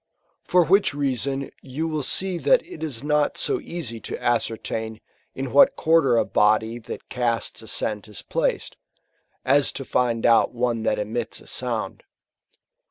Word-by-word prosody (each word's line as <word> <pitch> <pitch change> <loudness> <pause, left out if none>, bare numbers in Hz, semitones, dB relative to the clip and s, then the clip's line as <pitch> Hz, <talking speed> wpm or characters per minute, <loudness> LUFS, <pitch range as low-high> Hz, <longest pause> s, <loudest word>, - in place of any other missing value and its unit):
For 180 -1 +4
which 195 -2 +3
reason 140 -1 -2
you 145 +5 -4
will 155 -2 -2
see 180 +6 0
that - - +3
it 365 - -11
is 140 -6 -4
not 150 0 +1
so 400 -3 0
easy 150 - -5
to - - -6
ascertain 110 -1 -2 0.4
in 135 0 -4
what 275 0 +6
quarter 160 -7 +3
a - - +3
body 110 +2 +2
that 115 - -9
casts 120 -2 -1
a 110 - -11
scent 105 -1 -2
is 100 -6 -8
placed, - - -2 0.7
as 140 +2 +3
to^ndoutane 120 -2 +1
that - - +1
emits 110 +3 -3
a - - -16
sound. - - -3
130 Hz, 145 wpm, -24 LUFS, 115-155 Hz, 0.7 s, what